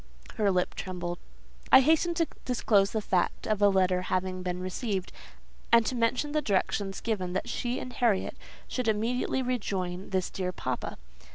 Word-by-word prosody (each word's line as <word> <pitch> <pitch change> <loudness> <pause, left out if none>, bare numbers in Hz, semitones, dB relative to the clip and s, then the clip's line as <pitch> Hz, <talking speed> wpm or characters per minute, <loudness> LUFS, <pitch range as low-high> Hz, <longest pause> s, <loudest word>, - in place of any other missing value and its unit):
Her 210 -2 +3
lip 180 -2 +1
trembled. 175 -2 -4 0.5
I - - +10
hastened 320 +4 +3
to 330 - +2 0.2
disclose 210 -5 +3
the 220 -1 -2
fact 185 -3 0
of 215 -1 0
a 205 - +7
letter 185 -2 +2
having 185 0 -1
been 180 0 -3
received, 185 +1 -3 0.6
and 230 -1 +6
to - - 0
mention 245 +5 +1
the 305 0 +1
directions 195 -2 0
given 190 -6 -2
that 190 - -2
she 240 +1 -2
and 250 - -7
Harriet 225 -5 +1 0.3
should 255 -2 -2
immediately 235 +4 0
rejoin 195 -7 -2
this 185 -2 -1
dear 185 -1 -2
papa. - - -4
205 Hz, 165 wpm, -29 LUFS, 185-245 Hz, 0.6 s, I